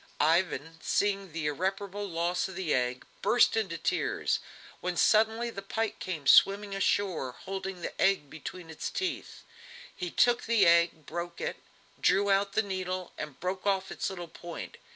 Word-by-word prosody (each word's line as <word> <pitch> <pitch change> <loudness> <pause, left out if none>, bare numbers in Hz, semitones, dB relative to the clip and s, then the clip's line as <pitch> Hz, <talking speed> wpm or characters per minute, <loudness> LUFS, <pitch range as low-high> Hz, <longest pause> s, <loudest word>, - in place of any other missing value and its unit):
Ivan, 165 -1 +1
seeing 200 -2 0
the 160 -1 -4
irreparable 195 +6 -2
loss 170 +1 0
of 190 - -9
the 180 -4 -1
egg, 125 0 0 0.2
burst 240 -1 +4
into 195 -7 -1
tears, - - 0 0.4
when 180 -1 -3
suddenly 225 +2 +3
the 195 - -6
pike 220 +2 -2
came 165 -6 -4
swimming 200 +4 +5
ashore, 190 -8 0
holding 190 -1 -5
the - - -5
egg 190 -7 +3
between 165 +3 -8
its 160 - -4
teeth. 375 -1 -4 0.5
He 180 - -4
took 240 +6 +3
the 230 -2 +4
egg, 170 -2 +4
broke 170 0 -5
it, - - -3 0.4
drew 200 0 +3
out 195 0 +2
the 220 - +2
needle 185 -2 -4
and 150 -3 -7
broke 185 +2 -3
off 195 -1 +1
its - - -2
little 175 -3 -6
point. 170 +1 -8
185 Hz, 160 wpm, -30 LUFS, 170-200 Hz, 0.5 s, swimming